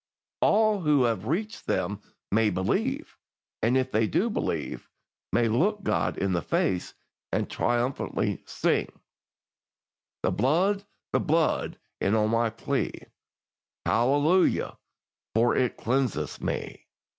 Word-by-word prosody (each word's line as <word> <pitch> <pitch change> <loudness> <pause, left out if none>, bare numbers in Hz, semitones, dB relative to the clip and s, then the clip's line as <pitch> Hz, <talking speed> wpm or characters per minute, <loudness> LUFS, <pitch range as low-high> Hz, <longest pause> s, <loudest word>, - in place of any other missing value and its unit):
All 215 -1 +4
who 150 -5 +3
have 110 -4 0
reached 210 - -2
them - - -1 0.3
may 110 +1 +3
believe, 225 - -1 0.4
and 120 +4 +3
if 130 0 0
they 110 0 +2
do 220 - +1
believe, - - -3 0.4
may 120 -1 +3
look 200 - +1
God - - 0
in 95 -1 0
the 85 - +1
face, 90 +3 -1 0.4
and - - 0
triumphantly 120 +2 -1
sing: - - 0 1.3
"'The - - +2
blood, 185 - +2 0.3
the - - +4
blood 160 -1 +1 0.2
is 100 +3 +2
all 105 -1 +3
my 115 +1 +2
plea, 115 +1 -2 0.9
Hallelujah, 145 +10 +2 0.6
for 120 +2 +4
it 125 -3 +1
cleanseth 130 -1 -1
me.'" - - -4
130 Hz, 120 wpm, -27 LUFS, 115-185 Hz, 1.3 s, All